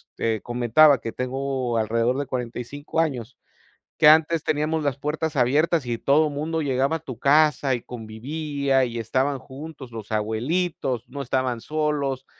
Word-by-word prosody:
te 110 Hz, -2 st, -1 dB
comentaba 125 Hz, +4 st, +4 dB
que 115 Hz, -, -4 dB
tengo 130 Hz, -1 st, -2 dB
alrededor 115 Hz, +3 st, +1 dB
de 145 Hz, -, -2 dB
45 125 Hz, +5 st, -4 dB
años, 130 Hz, -7 st, -3 dB, 0.6 s
que -, -, +5 dB
antes 160 Hz, +1 st, +5 dB
teníamos 155 Hz, +1 st, 0 dB
las 140 Hz, -2 st, 0 dB
puertas 155 Hz, +2 st, -2 dB
abiertas 145 Hz, +5 st, +2 dB
y 120 Hz, -, -1 dB
todo 150 Hz, +2 st, +3 dB
mundo 160 Hz, +3 st, -2 dB
llegaba 135 Hz, +2 st, +1 dB
a -, -, -5 dB
tu 130 Hz, -6 st, -8 dB
casa 145 Hz, -2 st, +3 dB
y 120 Hz, -, -4 dB
convivía, 135 Hz, +4 st, -2 dB
y 120 Hz, -1 st, -4 dB
estaban 130 Hz, +5 st, 0 dB
juntos, 140 Hz, 0 st, -10 dB
los 110 Hz, -1 st, -8 dB
abuelitos, 125 Hz, +3 st, -1 dB
no 140 Hz, +3 st, -7 dB
estaban 125 Hz, -2 st, -1 dB
solos, 145 Hz, -3 st, -1 dB
135 Hz, 150 wpm, -24 LUFS, 120-150 Hz, 0.6 s, que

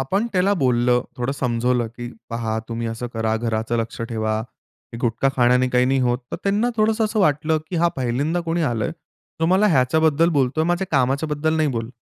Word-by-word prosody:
आपण 195 Hz, -, 0 dB
त्याला 190 Hz, +1 st, +2 dB
बोललं, 125 Hz, -5 st, +2 dB
थोडं 125 Hz, +2 st, -2 dB
समजावलं, 125 Hz, -2 st, 0 dB
की 120 Hz, 0 st, -6 dB, 0.2 s
"पहा, 115 Hz, -1 st, -2 dB
तुम्ही 115 Hz, 0 st, -3 dB
असं 115 Hz, +2 st, -4 dB
करा, 110 Hz, 0 st, 0 dB
घराचं 115 Hz, 0 st, -1 dB
लक्ष 115 Hz, 0 st, -4 dB
ठेवा, 110 Hz, -1 st, -1 dB, 0.6 s
गुटखा 120 Hz, +3 st, +1 dB
खाण्याने 125 Hz, +1 st, +3 dB
काही 125 Hz, 0 st, +2 dB
नाही 135 Hz, +1 st, +2 dB
होत." 125 Hz, 0 st, +1 dB
तर -, -, -1 dB
त्यांना 205 Hz, +4 st, +1 dB
थोडंसं 220 Hz, +1 st, +2 dB
असं 215 Hz, 0 st, 0 dB
वाटलं, 155 Hz, -2 st, +2 dB
की 180 Hz, -, -2 dB
हां, 170 Hz, +1 st, +3 dB
पहिल्यांदा 135 Hz, +7 st, -1 dB
कोणी 165 Hz, +1 st, 0 dB
आलंय 115 Hz, -3 st, -1 dB, 0.5 s
तो 165 Hz, -, +2 dB
मला 190 Hz, +4 st, +4 dB
ह्याच्याबद्दल 160 Hz, +1 st, +3 dB
बोलतोय, 140 Hz, +1 st, +1 dB
माझ्या 175 Hz, +3 st, 0 dB
कामाच्या 135 Hz, +2 st, +1 dB
बद्दल 150 Hz, +2 st, 0 dB
नाही 155 Hz, -1 st, +2 dB
बोलत. 115 Hz, -2 st, -3 dB
130 Hz, 185 wpm, -22 LUFS, 120-160 Hz, 0.6 s, मला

